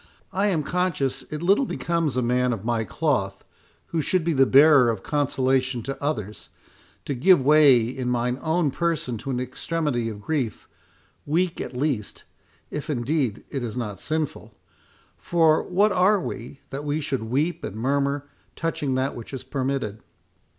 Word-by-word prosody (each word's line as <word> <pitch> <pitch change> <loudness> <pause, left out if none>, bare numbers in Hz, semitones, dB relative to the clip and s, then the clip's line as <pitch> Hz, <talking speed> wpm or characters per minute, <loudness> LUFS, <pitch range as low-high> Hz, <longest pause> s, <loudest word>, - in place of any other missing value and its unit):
I 195 +2 +1
am 170 -7 +1
conscious 145 -6 -1
it 155 +2 -4
little 200 +9 +3
becomes 165 -6 -1
a 125 - +1
man 125 +1 +1
of 110 -2 -6
my 115 -1 0
cloth, 100 - -1 0.4
who 165 - 0
should 180 +4 +1
be 165 0 +1
the 135 -2 +4
bearer 140 -3 +7
of 110 -4 -2
consolation 130 -3 0
to 135 +3 -6
others, 110 -9 -3 0.6
to 140 - -2
give 175 +8 +5
way 145 -4 +7
in 125 +2 -3
mine 125 +1 0
own 160 -2 +1
person 155 -8 -1
to 135 - -7
an 125 -2 -1
extremity 130 -1 -2
of 105 -2 -7
grief, 135 -7 -2 0.6
weak 170 +4 0
at - - -6
least, 130 -7 -2 0.5
if 150 0 -5
indeed 130 -3 -1
it 135 - -3
is 120 0 -4
not 105 -5 -4
sinful; 155 -2 -3 0.6
for 165 -2 +3
what 200 +4 +2
are 195 +2 +4
we, 135 -4 -7
that 140 +2 -4
we 150 +1 -1
should 140 -5 -2
weep 145 +9 -1
and - - -5
murmur 140 +4 0 0.3
touching 150 -5 -2
that 130 +1 0
which 115 - -9
is 130 - -6
permitted? 130 -6 -2
140 Hz, 165 wpm, -24 LUFS, 125-160 Hz, 0.6 s, bearer